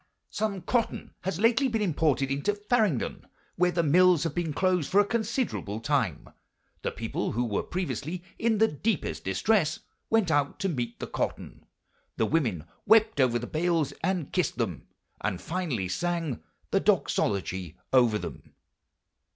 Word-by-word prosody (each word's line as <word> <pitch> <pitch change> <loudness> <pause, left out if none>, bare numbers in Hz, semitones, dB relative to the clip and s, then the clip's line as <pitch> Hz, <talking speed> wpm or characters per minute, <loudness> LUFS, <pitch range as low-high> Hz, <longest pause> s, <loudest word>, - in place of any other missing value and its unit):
"Some 205 -3 -2
cotton 240 -2 -1
has 190 0 -3
lately 235 +5 +4
been 230 -3 -1
imported 150 -6 +1
into 145 +10 0
Farringdon, 205 - 0 0.3
where 180 +1 +3
the 170 0 +1
mills 175 +1 +5
have 165 -3 -2
been 170 -2 -1
closed 180 -1 +1
for 195 - +4
a 205 - +5
considerable 220 - -2
time. 115 - 0 0.5
The - - -1
people, - - -3
who 120 +3 0
were 105 -4 0
previously 175 -1 -4 0.2
in 225 -1 +2
the 220 +2 +5
deepest 150 - -2
distress, 155 - +1 0.3
went 220 -7 +3
out 145 -2 +1
to 195 - +1
meet 120 -7 -3
the - - -3
cotton: - - -4 0.5
the 110 - +2
women 110 - 0 0.2
wept 220 -8 +5
over 120 -2 +3
the 120 - -4
bales 165 0 0
and 185 -6 -1
kissed 180 -8 0
them, 95 - -3 0.4
and 100 -4 -1
finally 155 - -2
sang 165 - -2 0.3
the - - +3
Doxology 95 -4 0 0.2
over 120 -4 +5
them." - - -8
165 Hz, 150 wpm, -28 LUFS, 120-195 Hz, 0.5 s, mills